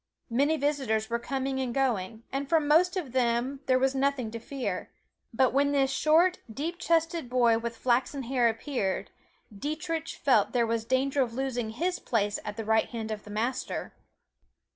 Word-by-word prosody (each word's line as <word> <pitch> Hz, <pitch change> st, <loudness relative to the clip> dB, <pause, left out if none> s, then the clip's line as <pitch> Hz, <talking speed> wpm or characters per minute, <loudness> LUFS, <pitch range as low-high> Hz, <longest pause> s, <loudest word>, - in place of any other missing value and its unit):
Many 285 Hz, +6 st, +2 dB
visitors 265 Hz, -7 st, 0 dB
were 235 Hz, -, +1 dB
coming 265 Hz, +1 st, -2 dB
and 255 Hz, -3 st, -2 dB
going, 225 Hz, -5 st, -1 dB
and 275 Hz, +1 st, -3 dB
from 320 Hz, -3 st, +3 dB
most 355 Hz, +5 st, +4 dB
of 305 Hz, -9 st, -4 dB
them 250 Hz, +2 st, 0 dB
there 255 Hz, -, +4 dB
was 265 Hz, +1 st, +2 dB
nothing 270 Hz, -4 st, 0 dB
to 230 Hz, -, -5 dB
fear, 230 Hz, -6 st, -4 dB, 0.4 s
but 250 Hz, +2 st, +2 dB
when 285 Hz, +1 st, +3 dB
this 270 Hz, -1 st, +2 dB
short, 330 Hz, +6 st, +3 dB
deep 325 Hz, +9 st, -4 dB
chested 330 Hz, -4 st, +1 dB
boy 240 Hz, -2 st, +3 dB
with 230 Hz, 0 st, -5 dB
flaxen 255 Hz, +3 st, 0 dB
hair 245 Hz, -1 st, +2 dB
appeared, 225 Hz, -4 st, -2 dB, 0.4 s
Dietrich 320 Hz, -, -3 dB
felt 250 Hz, -8 st, +2 dB
there 240 Hz, -2 st, +3 dB
was 225 Hz, 0 st, -1 dB
danger 265 Hz, +3 st, +1 dB
of 235 Hz, -3 st, -1 dB
losing 250 Hz, -4 st, -2 dB
his 345 Hz, +11 st, -2 dB
place 205 Hz, -3 st, 0 dB
at 210 Hz, +1 st, -6 dB
the 225 Hz, -, -4 dB
right 220 Hz, +1 st, +2 dB
hand 225 Hz, -2 st, -5 dB
of 210 Hz, -1 st, -5 dB
the -, -, -11 dB
Master. 235 Hz, +5 st, -3 dB
260 Hz, 175 wpm, -28 LUFS, 230-285 Hz, 0.4 s, most